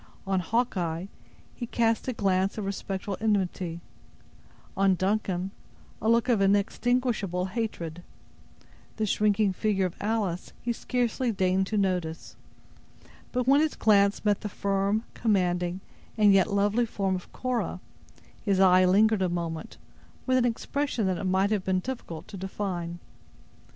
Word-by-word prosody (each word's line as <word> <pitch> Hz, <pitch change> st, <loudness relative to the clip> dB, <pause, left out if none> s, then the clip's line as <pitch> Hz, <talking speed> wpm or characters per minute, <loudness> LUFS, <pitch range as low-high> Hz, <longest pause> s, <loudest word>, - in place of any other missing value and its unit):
On 190 Hz, -1 st, +1 dB
Hawkeye 180 Hz, -4 st, -1 dB, 0.5 s
he 240 Hz, -, -6 dB
cast 225 Hz, 0 st, +1 dB
a 255 Hz, -, 0 dB
glance 195 Hz, -2 st, +1 dB
of 210 Hz, -, -3 dB
respectful 195 Hz, 0 st, -4 dB
enmity; 185 Hz, -5 st, -1 dB, 0.9 s
on 195 Hz, -1 st, +3 dB
Duncan, 190 Hz, -1 st, -1 dB, 0.5 s
a 220 Hz, -, +1 dB
look 235 Hz, +2 st, +3 dB
of 235 Hz, -5 st, +3 dB
inextinguishable 205 Hz, -1 st, +1 dB
hatred; 185 Hz, -6 st, -4 dB, 1.0 s
the 220 Hz, -, 0 dB
shrinking 210 Hz, -1 st, +2 dB
figure 195 Hz, -1 st, +1 dB
of 180 Hz, -, -4 dB
Alice 205 Hz, -5 st, -2 dB
he 240 Hz, -, -2 dB
scarcely 245 Hz, 0 st, -1 dB
deigned 190 Hz, -1 st, +1 dB
to 215 Hz, -, -1 dB
notice; 180 Hz, -5 st, -1 dB, 1.0 s
but 250 Hz, 0 st, 0 dB
when 280 Hz, +2 st, +6 dB
his 315 Hz, -1 st, 0 dB
glance 200 Hz, -1 st, +3 dB
met 205 Hz, -1 st, +2 dB
the 210 Hz, -, -4 dB
firm, 200 Hz, +2 st, 0 dB
commanding, 180 Hz, -4 st, 0 dB, 0.4 s
and 210 Hz, -2 st, +6 dB
yet 195 Hz, +2 st, +4 dB
lovely 205 Hz, +4 st, +2 dB
form 195 Hz, -3 st, -1 dB
of 180 Hz, -, -8 dB
Cora, 255 Hz, -2 st, -2 dB, 0.6 s
his 195 Hz, -3 st, +1 dB
eye 185 Hz, -1 st, +6 dB
lingered 210 Hz, +3 st, +4 dB
a 185 Hz, -, +2 dB
moment, 170 Hz, -2 st, -4 dB, 0.5 s
with 255 Hz, -, +2 dB
an 245 Hz, -, +2 dB
expression 245 Hz, 0 st, -1 dB
that 185 Hz, -2 st, 0 dB
it -, -, -4 dB
might 190 Hz, +2 st, +2 dB
have 205 Hz, -3 st, +1 dB
been 185 Hz, -1 st, +1 dB
difficult 185 Hz, -8 st, -6 dB
to 200 Hz, -, -8 dB
define. 180 Hz, -3 st, -4 dB
200 Hz, 140 wpm, -27 LUFS, 185-220 Hz, 1.0 s, when